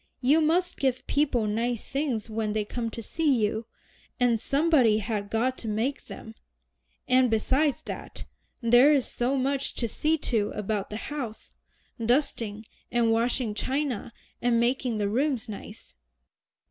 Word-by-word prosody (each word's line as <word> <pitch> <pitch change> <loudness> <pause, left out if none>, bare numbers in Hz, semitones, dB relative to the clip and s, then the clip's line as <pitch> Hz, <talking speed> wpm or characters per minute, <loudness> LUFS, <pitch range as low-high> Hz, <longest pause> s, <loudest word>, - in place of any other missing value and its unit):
"You 285 +5 +4
must 350 +3 +1
give 255 -2 0
people 275 -6 +1
nice 230 +2 -2
things 270 -6 -1
when 215 -1 -2
they 215 -1 -1
come 230 +2 -3
to 230 +1 -7
see 275 -5 +1
you, 220 +2 -3 0.5
and 240 -2 +3
somebody 275 -5 +3
has 210 -1 -2
got 245 +4 0
to 225 - -7
make 225 +6 -1
them. 220 - -9 0.7
And 255 -1 +4
besides 265 +6 +1
that, - - -7 0.4
there 240 +5 +6
is 280 -4 +3
so 255 +3 -1
much 270 +1 -1
to 235 - -1
see 310 +8 0
to 225 -8 0
about 210 -1 -2
the 210 - -4
house, 245 -4 -6 0.5
dusting, 225 -4 0 0.3
and 235 -1 +2
washing 230 0 0
china, 260 0 -2 0.3
and 240 -1 +3
making 245 -1 +1
the 205 -1 0
rooms 255 +2 0
nice." 210 - -9
240 Hz, 145 wpm, -27 LUFS, 220-275 Hz, 0.7 s, there